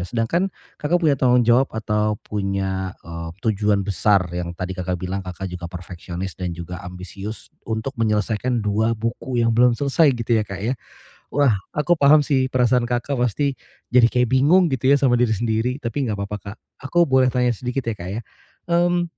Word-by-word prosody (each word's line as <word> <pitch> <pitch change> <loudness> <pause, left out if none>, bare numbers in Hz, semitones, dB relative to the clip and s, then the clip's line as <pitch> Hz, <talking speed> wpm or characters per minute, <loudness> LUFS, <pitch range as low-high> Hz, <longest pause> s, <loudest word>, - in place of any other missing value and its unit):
Sedangkan 120 - 0 0.3
Kakak 155 +4 +2
punya 155 - +5
tanggung 125 -2 +3
jawab 120 +3 +4
atau 105 -1 0
punya, 95 -2 -2
eee, 85 -1 -6 0.2
tujuan 105 -2 +1
besar 100 0 +2
yang 85 0 -3
tadi 90 0 -4
Kakak 90 -1 -3
bilang 95 +2 -3
Kakak 90 +1 -6
juga 90 -1 -6
perfeksionis 90 +1 -7
dan 90 -1 -2
juga 85 +1 -7
ambisius 95 +4 -8 0.2
untuk 110 +4 -2
menyelesaikan 110 +2 0
2 110 +2 +1
buku 115 +2 -2
yang 115 - +2
belum 125 0 +5
selesai 145 +4 +3
gitu 115 0 +1
ya, 110 - +1
Kak, 100 -2 -7
ya. 115 +5 0 0.6
Wah, 140 -3 +4 0.2
aku 170 +4 +2
paham 145 +1 +6
sih 130 -2 +1
perasaan 125 -1 +2
Kakak 120 +3 -1
pasti 135 +4 +1 0.4
jadi 120 -2 +6
kayak 125 0 +1
bingung 170 +3 +4
gitu 130 0 0
ya 140 - +6
sama 125 -3 +2
diri 110 -3 +2
sendiri. 115 +3 0
Tapi 130 +2 -1
enggak 105 - -1
apa-apa, 100 +1 -4 0.2
Kak. 110 - -13 0.3
Aku 175 +2 +4
boleh 130 -4 +3
tanya 125 -1 +1
sedikit 125 +3 -3
ya 115 - -1
Kak 90 -3 -8
ya, 105 +5 -3 0.5
mmm, 175 0 +3
115 Hz, 180 wpm, -22 LUFS, 100-130 Hz, 0.6 s, paham